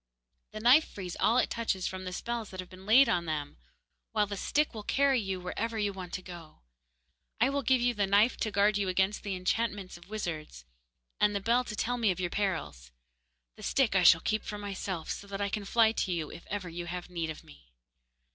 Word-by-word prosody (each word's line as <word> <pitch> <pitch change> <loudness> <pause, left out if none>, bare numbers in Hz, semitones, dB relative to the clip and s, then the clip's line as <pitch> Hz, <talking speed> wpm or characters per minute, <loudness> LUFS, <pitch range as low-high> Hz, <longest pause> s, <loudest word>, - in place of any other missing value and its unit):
The 215 - -7
knife 250 +8 +6
frees 180 -3 -7
all 230 - +3
it - - +2
touches 215 -5 -1
from 185 0 -4
the 185 - -4
spells 230 +3 -4
that 185 - -9
have 185 0 -7
been 185 +1 -13
laid 255 +6 +7
on 175 -1 +1
them; 150 -2 -4 0.6
while 210 -2 +3
the 200 0 -5
stick 295 +9 0
will 220 - -6
carry 270 +4 +2
you 195 -2 -3
wherever 225 +5 -3
you 205 -2 0
want 185 -2 -8
to 185 - -4
go. 170 -4 -11 0.8
I 250 +4 +3
will 280 0 0
give 255 -1 +3
you 245 0 +2
the 205 -3 0
knife 205 +5 +4
to 220 - -1
guard 205 +1 +3
you 195 -2 0
against 190 +2 +1
the 200 -2 -3
enchantments 195 0 -2
of 175 +2 -17
wizards, 160 - -5 0.5
and 210 0 +3
the - - +1
bell 235 +5 +2
to 215 - -5
tell 245 +4 -1
me 225 -3 +3
of 185 - -1
your 175 -1 -2
perils. 160 - -3 0.7
The - - -12
stick 265 -7 +2
I 185 - +5
shall 165 -2 +7
keep 215 -1 0
for 210 - -5
myself, 195 -4 -4
so 200 - -6
that 200 0 -5
I 200 0 0
can 205 0 -3
fly 225 +1 +4
to 205 -4 -1
you 165 -4 -2
if 170 - -11
ever 200 -3 -4
you 175 0 -6
have 180 0 -6
need 165 -2 -2
of 155 - -7
me. 70 -3 -18
200 Hz, 230 wpm, -30 LUFS, 180-220 Hz, 0.8 s, laid